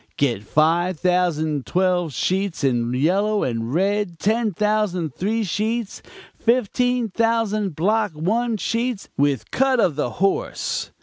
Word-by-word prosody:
Get 120 -8 +1
five 165 - +1
thousand 160 -6 0
twelve 180 -3 +1
sheets 185 - -1
in 120 -3 +1
yellow 195 +11 +1
and 115 -1 -2
red; 195 +2 0
ten 220 +4 +1
thousand 200 -6 0
three 220 - -1
sheets; 215 +3 -2 0.4
fifteen 245 0 +1
thousand 215 -4 0
block 210 +3 +1
one 220 +9 0
sheets 230 +1 -2
with 140 -6 0
cut 265 -1 +2
of 170 -9 +2
the 145 -4 -1
horse. 195 +2 -1
190 Hz, 125 wpm, -22 LUFS, 155-220 Hz, 0.4 s, cut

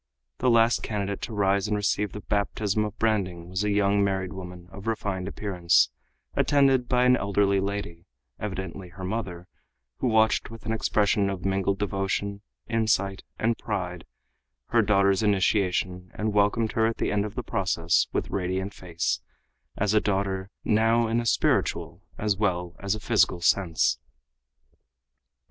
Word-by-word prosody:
The 130 - +2
last 115 0 +4
candidate 100 -2 -3
to - - -5
rise 100 0 +2
and 105 0 0
receive 105 0 0
the 105 - -7
baptism 105 +1 0
of 105 +1 -6
branding 90 -6 -1
was 95 +2 -1
a 105 - 0
young 100 0 +3
married 95 -1 -1
woman 90 -2 -9
of 100 +2 -10
refined 100 -4 -2
appearance, 90 -4 +2 0.4
attended 135 -3 +3
by 125 -1 +3
an 125 0 +6
elderly 100 -2 +2
lady, 95 -3 -4 0.3
evidently 95 -2 -5
her 95 +2 -10
mother, 90 -3 -4 0.5
who 130 - -1
watched 110 -1 +3
with 115 0 -11
an 110 - -2
expression 105 -2 +2
of 95 -2 -5
mingled 95 0 +1
devotion, 100 0 -2 0.3
insight 100 -4 +1 0.2
and 115 +1 0
pride 90 -5 -4 0.6
her - - +4
daughter's 100 -1 +3
initiation 95 -3 +1
and 105 0 -1
welcomed 105 +2 +2
her 110 0 +2
at 115 - -2
the - - -1
end 105 -1 +1
of 105 - -6
the - - -3
process - - +1
with - - -2
radiant 95 +1 -2
face, 85 -2 -2 0.6
as 105 0 +1
a 105 - +4
daughter, 95 -1 -1 0.2
now, 115 +2 +3
in 115 +1 +1
a 120 - -4
spiritual 90 -4 +1 0.2
as 105 -1 0
well 90 -3 -1
as 100 +1 -1
a - - -6
physical 105 -5 +2
sense. 80 -9 +2
100 Hz, 155 wpm, -26 LUFS, 95-110 Hz, 0.6 s, an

